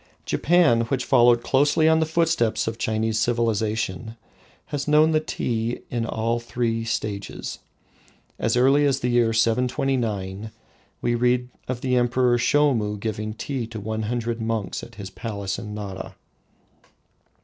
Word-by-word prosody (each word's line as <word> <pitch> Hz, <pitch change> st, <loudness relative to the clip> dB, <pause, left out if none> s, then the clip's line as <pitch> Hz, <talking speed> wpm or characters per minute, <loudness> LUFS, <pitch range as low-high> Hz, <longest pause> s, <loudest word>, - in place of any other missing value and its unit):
Japan, 160 Hz, -8 st, +3 dB
which 130 Hz, +2 st, -2 dB
followed 120 Hz, -2 st, +5 dB
closely 145 Hz, +3 st, +3 dB
on 160 Hz, 0 st, +5 dB
the 160 Hz, -, +1 dB
footsteps 155 Hz, -10 st, +1 dB
of 115 Hz, 0 st, -3 dB
Chinese 110 Hz, 0 st, 0 dB
civilisation, 115 Hz, -2 st, -1 dB, 0.6 s
has 140 Hz, 0 st, -2 dB
known 155 Hz, +1 st, +5 dB
the 155 Hz, -, +3 dB
tea 120 Hz, -6 st, -2 dB
in 115 Hz, -1 st, -1 dB
all 115 Hz, +1 st, -1 dB
its 120 Hz, 0 st, -10 dB
three 115 Hz, -2 st, -1 dB
stages. 105 Hz, -3 st, -4 dB, 0.8 s
As 115 Hz, +2 st, +1 dB
early 135 Hz, +4 st, +4 dB
as 135 Hz, -1 st, 0 dB
the 125 Hz, -, 0 dB
year 120 Hz, -2 st, +3 dB
729 115 Hz, -4 st, 0 dB, 0.5 s
we 120 Hz, -, +1 dB
read 125 Hz, +1 st, +1 dB, 0.2 s
of 125 Hz, -1 st, -3 dB
the 130 Hz, -1 st, +1 dB
Emperor 120 Hz, 0 st, +2 dB
Shomu 120 Hz, -6 st, +2 dB
giving 110 Hz, 0 st, -4 dB
tea 125 Hz, 0 st, -4 dB
to 115 Hz, -1 st, -7 dB
one 110 Hz, +1 st, -3 dB
hundred 120 Hz, -1 st, -2 dB
monks 110 Hz, -2 st, -2 dB
at -, -, -12 dB
his 95 Hz, -2 st, -8 dB
palace 100 Hz, -2 st, -4 dB
in 105 Hz, -2 st, -7 dB
Nara. 95 Hz, -3 st, -7 dB
115 Hz, 145 wpm, -24 LUFS, 110-125 Hz, 0.8 s, followed